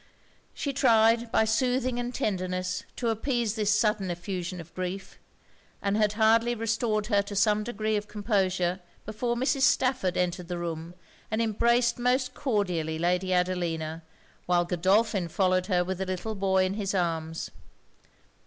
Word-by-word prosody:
She 280 Hz, -, -3 dB
tried, 230 Hz, -3 st, +4 dB
by 220 Hz, -, +3 dB
soothing 250 Hz, +2 st, +1 dB
and 245 Hz, 0 st, -3 dB
tenderness, 185 Hz, -4 st, -2 dB
to 235 Hz, -, -1 dB
appease 230 Hz, -1 st, 0 dB
this 215 Hz, -3 st, -1 dB
sudden 210 Hz, -2 st, +2 dB
effusion 180 Hz, +1 st, -4 dB
of 170 Hz, 0 st, -11 dB
grief; 185 Hz, +1 st, -5 dB, 0.6 s
and 200 Hz, 0 st, 0 dB
had 210 Hz, -1 st, +2 dB
hardly 230 Hz, +2 st, +3 dB
restored 225 Hz, -1 st, 0 dB
her 205 Hz, -2 st, +2 dB
to 200 Hz, 0 st, -7 dB
some 210 Hz, +1 st, +3 dB
degree 215 Hz, -1 st, -2 dB
of 210 Hz, 0 st, -2 dB
composure, 190 Hz, -4 st, 0 dB, 0.3 s
before 235 Hz, +3 st, -2 dB
Mrs. 265 Hz, +3 st, 0 dB
Stafford 255 Hz, -9 st, +2 dB
entered 180 Hz, -1 st, -1 dB
the 175 Hz, 0 st, -3 dB
room 170 Hz, 0 st, -5 dB, 0.3 s
and 220 Hz, -, -1 dB
embraced 235 Hz, +2 st, +2 dB
most 255 Hz, +1 st, +1 dB
cordially 180 Hz, -, -1 dB
Lady 180 Hz, +3 st, 0 dB
Adelina, 170 Hz, -3 st, -1 dB, 0.5 s
while 175 Hz, -1 st, +3 dB
Godolphin 190 Hz, +2 st, +2 dB
followed 185 Hz, +1 st, +1 dB
her 180 Hz, -3 st, +2 dB
with 185 Hz, +1 st, -4 dB
the 190 Hz, -, -1 dB
little 185 Hz, +4 st, -3 dB
boy 190 Hz, -2 st, +2 dB
in 185 Hz, -, -1 dB
his 200 Hz, -1 st, -2 dB
arms. 165 Hz, -3 st, -2 dB
200 Hz, 150 wpm, -27 LUFS, 180-225 Hz, 0.6 s, tried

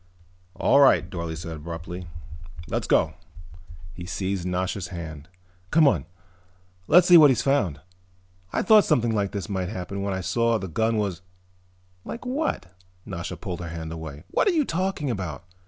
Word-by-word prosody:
"All 140 Hz, -, +4 dB
right," 140 Hz, -2 st, +5 dB
Dorle 85 Hz, -3 st, -5 dB
said 80 Hz, 0 st, -6 dB
abruptly. 85 Hz, +3 st, -7 dB, 0.6 s
"Let's -, -, -2 dB
go." -, -, +3 dB, 0.8 s
He 90 Hz, 0 st, -8 dB
seized 95 Hz, -2 st, -2 dB
Nasha's 90 Hz, +1 st, -2 dB
hand. 80 Hz, -3 st, -8 dB, 0.4 s
"Come 160 Hz, -, +5 dB
on. -, -, +1 dB, 0.8 s
Let's 175 Hz, +2 st, +6 dB
see 175 Hz, -, +9 dB
what 150 Hz, -3 st, +8 dB
he's 125 Hz, -4 st, +1 dB
found. 100 Hz, -, +1 dB, 0.7 s
I -, -, 0 dB
thought 215 Hz, +1 st, +7 dB
something 115 Hz, -7 st, +1 dB
like 100 Hz, -2 st, 0 dB
this 100 Hz, -2 st, -4 dB
might 95 Hz, -3 st, -2 dB
happen 100 Hz, -1 st, -5 dB
when 100 Hz, -1 st, -2 dB
I 95 Hz, -, -3 dB
saw 115 Hz, +5 st, +1 dB
that 100 Hz, -, -5 dB
the 85 Hz, -, -9 dB
gun 110 Hz, 0 st, +1 dB
was 100 Hz, -5 st, -2 dB, 0.4 s
" 90 Hz, 0 st, -36 dB
"Like 235 Hz, -, -7 dB
what?" 255 Hz, -, -2 dB, 0.3 s
Nasha -, -, -5 dB
pulled 90 Hz, -, -5 dB
her 85 Hz, -2 st, -6 dB
hand 80 Hz, -1 st, -6 dB
away. 80 Hz, -2 st, -7 dB
"What -, -, +2 dB
are 390 Hz, -, +4 dB
you 300 Hz, -, +3 dB
talking 185 Hz, -, -1 dB
about? 90 Hz, -, -5 dB
95 Hz, 170 wpm, -25 LUFS, 85-120 Hz, 0.8 s, see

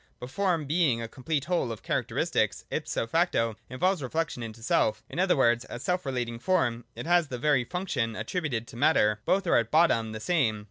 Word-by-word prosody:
But 125 Hz, +1 st, -8 dB
Form, 180 Hz, -5 st, 0 dB
being 150 Hz, -5 st, +2 dB
a 115 Hz, -, -4 dB
complete 140 Hz, +4 st, -3 dB
whole 170 Hz, -8 st, 0 dB
of 110 Hz, -, -8 dB
char -, -, 0 dB
acteristics, -, -, -1 dB
ipso -, -, -2 dB
facto 115 Hz, -, +1 dB
involves 180 Hz, +7 st, 0 dB
reflection 150 Hz, 0 st, -2 dB
into 115 Hz, -1 st, -8 dB
self; 110 Hz, -, +1 dB
in -, -, -6 dB
other 185 Hz, -3 st, +3 dB
words, 120 Hz, -2 st, +3 dB
as 120 Hz, -, -8 dB
self 180 Hz, -2 st, -1 dB
relating 120 Hz, -3 st, -3 dB
Form 120 Hz, -8 st, 0 dB
it -, -, -6 dB
has 175 Hz, -1 st, +3 dB
the 125 Hz, -, -5 dB
very 140 Hz, -1 st, +2 dB
function 130 Hz, -8 st, -2 dB
attributed 120 Hz, -, -3 dB
to -, -, -11 dB
Matter. 105 Hz, -5 st, +3 dB
Both 195 Hz, 0 st, +2 dB
are 170 Hz, -, +4 dB
at 115 Hz, -1 st, +1 dB
bottom 115 Hz, -8 st, +3 dB
the 110 Hz, -, -6 dB
same. 115 Hz, -6 st, +1 dB
130 Hz, 200 wpm, -28 LUFS, 115-170 Hz, -, are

